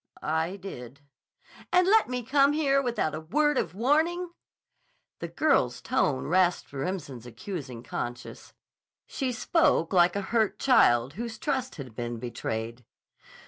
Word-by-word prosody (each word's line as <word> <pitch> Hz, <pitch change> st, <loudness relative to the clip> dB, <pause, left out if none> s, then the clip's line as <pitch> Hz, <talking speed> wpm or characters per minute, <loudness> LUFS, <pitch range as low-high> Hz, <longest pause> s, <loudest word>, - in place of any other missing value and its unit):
"I 160 Hz, +4 st, -1 dB
did." 140 Hz, -9 st, -9 dB, 0.7 s
"And 360 Hz, 0 st, +4 dB
let 435 Hz, -, +4 dB
me 250 Hz, -1 st, -3 dB
come 280 Hz, +4 st, +3 dB
here 275 Hz, -3 st, +2 dB
without 235 Hz, -, -1 dB
a 155 Hz, -, -4 dB
word 295 Hz, -, +1 dB
of 170 Hz, +1 st, -3 dB
warning?" 320 Hz, -, +1 dB, 0.9 s
The -, -, -4 dB
girl's 130 Hz, -, +1 dB
tone 135 Hz, -3 st, 0 dB
rasped 180 Hz, -1 st, +1 dB
Remsen's 135 Hz, -5 st, -5 dB
accusing 125 Hz, -, -7 dB
conscience. 120 Hz, 0 st, -6 dB, 0.5 s
She 265 Hz, -3 st, -3 dB
spoke 230 Hz, -, +1 dB
like 175 Hz, 0 st, +4 dB
a 200 Hz, -, -1 dB
hurt 220 Hz, -3 st, +2 dB
child 130 Hz, -, +4 dB
whose 230 Hz, +2 st, -6 dB
trust 260 Hz, -4 st, -2 dB
has 140 Hz, -4 st, -8 dB
been 120 Hz, +1 st, -5 dB
betrayed. 115 Hz, 0 st, -5 dB
185 Hz, 135 wpm, -27 LUFS, -, 0.9 s, And